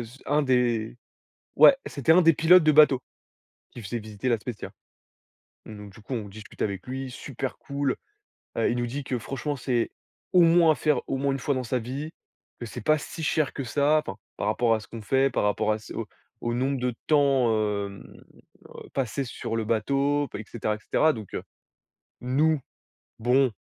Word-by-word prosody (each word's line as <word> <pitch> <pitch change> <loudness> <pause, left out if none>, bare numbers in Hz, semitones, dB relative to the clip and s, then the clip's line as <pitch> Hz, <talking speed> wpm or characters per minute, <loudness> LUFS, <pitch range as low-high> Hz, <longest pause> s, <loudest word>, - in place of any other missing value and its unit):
s 120 +4 -12
un 150 +2 +2
des 120 -4 +1 0.6
ouais, 275 - +8
c'était 140 +2 +2
un 180 +2 +6
des 165 0 +6
pilotes 165 +2 +6
de 155 - +5
bateau 145 -4 +6 0.7
qui 120 - -9
faisait 115 +4 -4
visiter 110 +3 -4
La 115 - +3
Spezia, 110 0 -7 1.0
donc 105 -2 -10
du 105 - -15
coup 125 +5 -6
on 110 -3 -4
discute 105 +2 -9
avec 100 -1 -3
lui, 130 +1 -5
super 130 0 -6
cool. 140 -1 -2 0.6
Heu, - - +2
il 120 - -1
nous 120 - -1
dit 140 +4 -4
que 125 -2 -3
franchement 135 +5 -4
c'est 125 -2 -1 0.4
au 180 - +7
moins 165 -1 +6
à 155 - +2
faire 150 -4 +1
au - - -1
moins 140 +1 0
une 135 - -2
fois 140 - 0
dans 130 - -2
sa 125 +2 -1
vie, 135 +7 -5 0.5
que 120 - -5
c'est 115 - -7
pas 155 +8 +3
si 160 +2 -8
cher 155 0 +1
que 140 - -4
ça, 145 +5 +2
enfin, 95 - -6 0.2
par 100 - -2
rapport 115 +2 +2
à - - -2
ce - - -14
qu'on 115 - -8
fait, 135 +5 +2
par - - 0
rapport 105 +1 +1
à 110 - -1
ce 105 - -11
au - - -4 0.3
au 120 - -2
nombre 130 +2 0
de 125 0 -1
temps, 140 -5 +3 0.4
hem, 100 -1 -9 0.6
heu, - - -12
passé 135 +1 -1
sur 115 -1 -5
le 115 - -1
bateau 140 +6 +1
b - - -4
et 105 - -6
cetera 110 -2 -2
et - - -11
cetera, 155 +8 +2
donc 110 -5 -9
heu, - - -4 0.8
nous, 145 +5 +2 0.6
bon, 125 +3 +3
130 Hz, 205 wpm, -26 LUFS, 115-145 Hz, 1.0 s, ouais